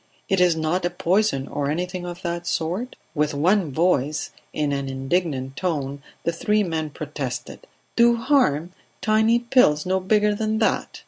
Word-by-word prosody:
"It 190 -2 +2
is 175 -2 +4
not 160 +3 0
a 175 - +1
poison, 175 -4 +1
or 145 -1 -2
anything 180 +3 -3
of 175 +1 -8
that 170 0 -3
sort?" 180 +10 -2 0.2
With 150 -1 0
one 175 +2 +2
voice, 155 -2 +1 0.2
in 150 -1 -1
an 140 -1 -2
indignant 135 -1 -1
tone, 140 -6 -2 0.2
the 170 - +1
three 210 +5 +1
men 160 -4 -2
protested: 145 -4 -6 0.3
"Do 235 0 +5
harm? 230 - +2 0.3
Tiny 220 +2 +3
pills 235 - +3
no 190 +1 +1
bigger 210 +2 +2
than 215 +1 -1
that!" 220 - 0
175 Hz, 155 wpm, -23 LUFS, 150-205 Hz, 0.3 s, Do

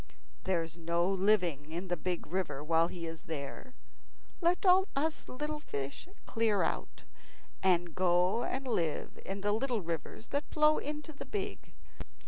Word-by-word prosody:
There's 165 -3 0
no 170 +1 +1
living 185 -6 +2
in 175 +3 -3
the 175 - +1
big 175 +1 -2
river 165 -5 -2
while 165 +1 +4
he 170 -1 -6
is 165 -1 -6
here. 160 - -6 0.7
Let 350 +3 +3
all 375 +1 +7
us 310 +3 -1
little 300 +3 -3
fish 140 - -5 0.2
clear 225 -4 +2
out, - - -3 0.6
and 175 -3 +3
go 180 +5 +3
and 265 +1 -2
live 165 -10 -1
in 195 +1 -4
the 205 +1 +2
little 235 +1 +1
rivers 170 +5 -5
that 285 +1 -1
flow 305 0 +4
into 300 +1 -5
the 280 - -8
big. 410 -1 -4
190 Hz, 150 wpm, -33 LUFS, 170-275 Hz, 0.7 s, all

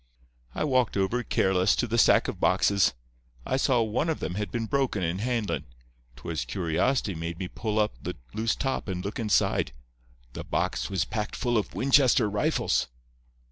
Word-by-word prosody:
"I - - -1
walked 130 -7 +1
over, 100 +6 +1
careless, 95 -4 +2
to - - 0
the 115 0 0
stack - - +5
of - - -5
boxes. 100 -9 +3 0.5
I - - 0
saw 130 -3 +2
one 115 +9 -1
of 160 - -1
them - - -3
had 105 0 -3
been 115 +1 -2
broken 130 -6 0
in 85 +3 -1
handlin'. 115 -2 -1 0.5
'Twas 80 +6 -4
curiosity 95 +5 0
made 85 0 -5
me 90 0 -4
pull 110 +3 -3
up 105 -1 +2
the - - -5 0.2
loose 110 0 0
top 135 -4 -2
and 90 -1 -4
look 100 - -4
inside. 105 - +1 0.6
The - - -6
box - - -1
was 95 -4 0
packed 105 -2 -4
full 120 -1 -1
of 105 - -1
Winchester 130 -4 +4
rifles. 105 -8 0
105 Hz, 175 wpm, -27 LUFS, 95-120 Hz, 0.6 s, stack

